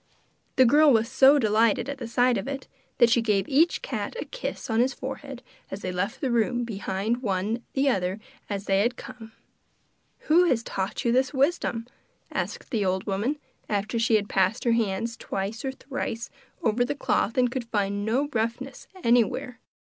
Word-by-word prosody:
The 260 Hz, -, +6 dB
girl 295 Hz, +4 st, +6 dB
was 225 Hz, -2 st, +3 dB
so 270 Hz, +3 st, +6 dB
delighted 225 Hz, 0 st, +2 dB
at 280 Hz, -1 st, -5 dB
the 235 Hz, -, -5 dB
sight 245 Hz, +2 st, +3 dB
of 195 Hz, -, -3 dB
it 275 Hz, -1 st, -5 dB, 0.3 s
that 235 Hz, -2 st, +5 dB
she 235 Hz, -, +4 dB
gave 210 Hz, -3 st, +1 dB
each 320 Hz, -, +2 dB
cat -, -, -4 dB
a -, -, -4 dB
kiss -, -, -5 dB
on 225 Hz, -2 st, 0 dB
his 255 Hz, +3 st, +2 dB
forehead 265 Hz, -1 st, -7 dB, 0.3 s
as 195 Hz, -, -6 dB
they 185 Hz, -, -2 dB
left 185 Hz, +4 st, -3 dB
the 265 Hz, -4 st, 0 dB
room 240 Hz, +1 st, +1 dB
behind 210 Hz, +1 st, -2 dB
one 210 Hz, +1 st, -1 dB
the 275 Hz, +1 st, +1 dB
other 190 Hz, -5 st, 0 dB, 0.3 s
as 200 Hz, -1 st, -3 dB
they 195 Hz, 0 st, +2 dB
had 240 Hz, +5 st, +1 dB
come. 235 Hz, -3 st, -10 dB, 0.9 s
'Who 340 Hz, +4 st, +4 dB
has 245 Hz, -9 st, +1 dB
taught 190 Hz, +2 st, -3 dB
you 235 Hz, -, +3 dB
this 260 Hz, +3 st, +1 dB
wisdom?' 265 Hz, -5 st, +1 dB, 0.5 s
asked -, -, -4 dB
the 220 Hz, -5 st, +1 dB
old 190 Hz, 0 st, 0 dB
woman, 210 Hz, +9 st, -1 dB, 0.3 s
after 215 Hz, +3 st, -1 dB
she 230 Hz, 0 st, +3 dB
had 205 Hz, -1 st, +1 dB
passed 195 Hz, +4 st, +1 dB
her 235 Hz, -, +2 dB
hands 230 Hz, 0 st, 0 dB
twice 200 Hz, +3 st, -4 dB
or 270 Hz, -, -1 dB
thrice 255 Hz, -3 st, -5 dB, 0.3 s
over 230 Hz, +1 st, +2 dB
the 265 Hz, +4 st, -2 dB
cloth 230 Hz, -3 st, 0 dB
and 250 Hz, -1 st, +3 dB
could 255 Hz, -2 st, -3 dB
find 205 Hz, -2 st, -1 dB
no 250 Hz, +7 st, +1 dB
roughness 235 Hz, +4 st, -3 dB, 0.2 s
anywhere. 240 Hz, +1 st, +1 dB
230 Hz, 185 wpm, -26 LUFS, 210-260 Hz, 0.9 s, The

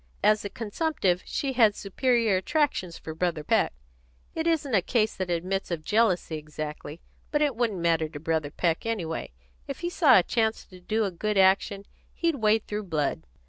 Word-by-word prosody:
As 215 Hz, 0 st, +4 dB
a 205 Hz, -, -4 dB
consumptive, 210 Hz, -, -1 dB
she 275 Hz, -2 st, -2 dB
had 225 Hz, -5 st, +4 dB
superior 230 Hz, +1 st, +1 dB
attractions 190 Hz, -, 0 dB
for 160 Hz, -, -7 dB
Brother 165 Hz, -2 st, -1 dB
Peck. -, -, +2 dB, 0.6 s
It 320 Hz, +1 st, -2 dB
isn't 300 Hz, -6 st, 0 dB
a 195 Hz, -, +4 dB
case 215 Hz, +3 st, 0 dB
that 185 Hz, -1 st, -3 dB
admits 185 Hz, +3 st, -2 dB
of 170 Hz, -3 st, -3 dB
jealousy 205 Hz, -7 st, +1 dB
exactly, 150 Hz, +1 st, -7 dB, 0.3 s
but 295 Hz, 0 st, +1 dB
it 285 Hz, -4 st, +1 dB
wouldn't 225 Hz, -4 st, 0 dB
matter 165 Hz, -2 st, +1 dB
to 150 Hz, -, -8 dB
Brother 160 Hz, -1 st, -1 dB
Peck 165 Hz, +2 st, -1 dB
anyway. 175 Hz, -, -3 dB, 0.4 s
If -, -, -6 dB
he 345 Hz, -, -2 dB
saw 290 Hz, -, +6 dB
a 185 Hz, -, +5 dB
chance 220 Hz, +1 st, 0 dB
to 185 Hz, -, -15 dB
do 220 Hz, +5 st, 0 dB
a 195 Hz, -, -2 dB
good 210 Hz, +4 st, -2 dB
action, 195 Hz, +1 st, +3 dB, 0.3 s
he'd 335 Hz, -4 st, 0 dB
wade 220 Hz, -1 st, +2 dB
through 210 Hz, 0 st, -4 dB
blood." 150 Hz, -, -2 dB
200 Hz, 180 wpm, -27 LUFS, 170-230 Hz, 0.6 s, saw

